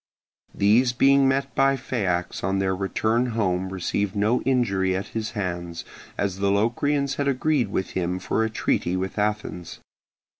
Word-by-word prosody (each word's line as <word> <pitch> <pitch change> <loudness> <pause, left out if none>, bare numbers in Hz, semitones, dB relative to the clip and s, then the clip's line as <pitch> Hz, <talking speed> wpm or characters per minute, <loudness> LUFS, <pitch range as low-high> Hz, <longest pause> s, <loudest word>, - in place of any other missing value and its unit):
These 115 +5 +3
being 135 +2 +4
met 135 +1 0
by 135 0 +3
Phaeax 95 -9 -2
on 95 +1 0
their 95 -1 0
return 110 +5 0
home 95 -3 0
received 95 +2 -2
no 105 +4 +2
injury 100 -8 +1
at 95 - -4
his 110 -1 -4
hands, 85 -3 -4 0.3
as 95 -1 -2
the 100 0 +1
Locrians 135 +7 +1
had 140 - 0
agreed 140 -2 +1
with 95 -2 -3
him 90 0 -1
for 100 +4 -1
a 110 - 0
treaty 95 -4 0
with 95 +3 -3
Athens. 105 -4 -3
105 Hz, 155 wpm, -24 LUFS, 95-125 Hz, 0.3 s, being